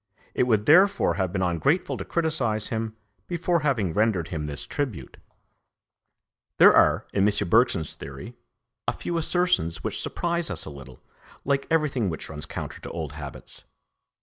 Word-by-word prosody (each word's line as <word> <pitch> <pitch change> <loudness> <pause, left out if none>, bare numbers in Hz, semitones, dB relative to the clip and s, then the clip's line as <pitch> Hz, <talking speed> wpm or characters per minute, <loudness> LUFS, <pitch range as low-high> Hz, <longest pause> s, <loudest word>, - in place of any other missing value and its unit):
It 125 - +1
would 110 -3 +2
therefore 185 - +5
have 95 -2 -1
been 95 -1 -1
ungrateful 135 - +1
to - - -5
criticise 130 -11 -1
him 110 -1 -3 0.3
before 175 0 0
having 120 - 0
rendered 100 -6 +1
him 75 -3 -4
this 70 -1 -6
tribute. 120 - -4 1.4
There - - +8
are, - - +4
in 100 - +2
M. 105 - +1
Bergson's 115 - +3
theory, 70 0 -9 0.5
a - - +1
few 170 -1 -3
assertions 175 - +1
which - - -1
surprise 170 -1 -1
us - - -2
a - - -7
little, 65 -2 -12 0.4
like 140 0 0
everything 150 - +1
which 80 - -6
runs 75 -1 -6
counter - - -6
to - - -7
old 80 -4 -5
habits. 75 -3 -6
110 Hz, 155 wpm, -25 LUFS, -, 1.4 s, There